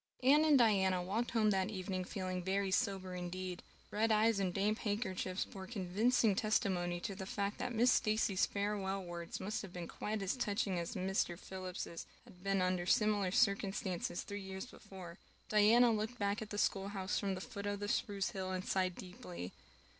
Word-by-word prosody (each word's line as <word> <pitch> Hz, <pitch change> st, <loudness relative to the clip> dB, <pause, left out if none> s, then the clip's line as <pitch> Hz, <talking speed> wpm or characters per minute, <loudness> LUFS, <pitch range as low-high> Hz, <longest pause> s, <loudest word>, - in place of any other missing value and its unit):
Anne 290 Hz, +4 st, +6 dB
and 305 Hz, -3 st, +6 dB
Diana 190 Hz, -6 st, +4 dB
walked 215 Hz, +6 st, -1 dB
home 215 Hz, -2 st, +3 dB
that 190 Hz, 0 st, +1 dB
evening 185 Hz, -2 st, -3 dB
feeling 185 Hz, -1 st, -3 dB
very 195 Hz, +1 st, 0 dB
sober 190 Hz, -3 st, 0 dB
indeed. 180 Hz, 0 st, -4 dB, 0.3 s
Red 220 Hz, +2 st, +2 dB
eyes 215 Hz, 0 st, +4 dB
and 190 Hz, -2 st, +1 dB
damp 205 Hz, +4 st, +1 dB
handkerchiefs 195 Hz, -3 st, -1 dB
bore 190 Hz, -1 st, -9 dB
convincing 215 Hz, +2 st, +2 dB
testimony 185 Hz, -4 st, +1 dB
to 195 Hz, -, -3 dB
the 190 Hz, 0 st, -6 dB
fact 200 Hz, +1 st, -2 dB
that 250 Hz, -1 st, -2 dB
Miss 240 Hz, +2 st, +4 dB
Stacy's 215 Hz, -4 st, +2 dB
farewell 200 Hz, -1 st, -1 dB
words 170 Hz, -1 st, -6 dB
must 210 Hz, +3 st, -2 dB
have 195 Hz, -, -8 dB
been 175 Hz, -1 st, -6 dB
quite 210 Hz, -1 st, -3 dB
as 195 Hz, -, 0 dB
touching 205 Hz, -6 st, 0 dB
as 170 Hz, -, -4 dB
Mr. 185 Hz, -2 st, 0 dB
Phillips's 185 Hz, -2 st, -6 dB, 0.2 s
had 180 Hz, 0 st, -17 dB
been 195 Hz, -1 st, +2 dB
under 185 Hz, -1 st, 0 dB
similar 210 Hz, -1 st, +3 dB
circumstances 195 Hz, -2 st, +1 dB
three 205 Hz, 0 st, -5 dB
years 190 Hz, +2 st, -6 dB
before. 190 Hz, -7 st, -11 dB, 0.3 s
Diana 225 Hz, +3 st, +6 dB
looked 220 Hz, +2 st, -1 dB
back 205 Hz, 0 st, 0 dB
at 215 Hz, -, -6 dB
the 205 Hz, -, -4 dB
schoolhouse 195 Hz, -1 st, 0 dB
from 195 Hz, -2 st, -1 dB
the -, -, -5 dB
foot 200 Hz, +1 st, -6 dB
of 205 Hz, 0 st, -2 dB
the 205 Hz, -, -3 dB
spruce 200 Hz, -2 st, 0 dB
hill 190 Hz, -1 st, -3 dB
and 185 Hz, 0 st, -3 dB
sighed 185 Hz, -2 st, +1 dB
deeply. 90 Hz, -, -8 dB
195 Hz, 180 wpm, -36 LUFS, 185-210 Hz, 0.3 s, Anne